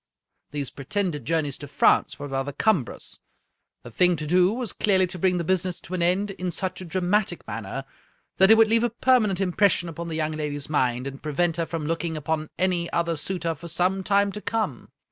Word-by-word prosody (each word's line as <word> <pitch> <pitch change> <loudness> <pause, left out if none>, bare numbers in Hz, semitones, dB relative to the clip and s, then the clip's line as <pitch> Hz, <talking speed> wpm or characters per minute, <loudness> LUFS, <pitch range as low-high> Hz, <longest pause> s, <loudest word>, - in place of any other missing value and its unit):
These 145 -2 -4
pre 135 - -10
tended 170 - -1
journeys 150 -2 -1
to 145 - -8
France 140 - +3
were 145 -1 -6
rather 135 +1 -2
cumbrous. 150 - -1 0.6
The 120 - -10
thing 180 +8 +3
to 155 -1 -5
do 180 +4 +4
was 240 0 -3
clearly 190 -3 +3
to 180 0 -6
bring 180 0 +2
the 170 - -1
business 185 0 0
to 180 - -9
an 180 - -1
end 185 +4 +1
in 185 -1 -4
such 185 +2 -3
a - - -6
dramatic 180 +2 0
manner 115 +5 -5 0.5
that 190 +1 +6
it 220 - +8
would 225 - +7
leave 225 +1 +3
a 240 - +2
permanent 230 -5 +2
impression 185 -2 +2
upon 170 +1 -6
the 165 - -4
young 155 -1 -1
lady's 150 -1 -4
mind, 125 -3 +1
and 135 0 -7
prevent 165 +2 0
her 165 -1 -1
from 165 -3 -4
looking 165 0 -2
upon 155 +1 -2
any 180 -2 +1
other 170 -1 0
suitor 170 +1 -2
for 165 +3 -10
some 185 +3 0
time 200 +1 +2
to 210 - -7
come. 210 - -2
170 Hz, 210 wpm, -25 LUFS, 150-190 Hz, 0.6 s, it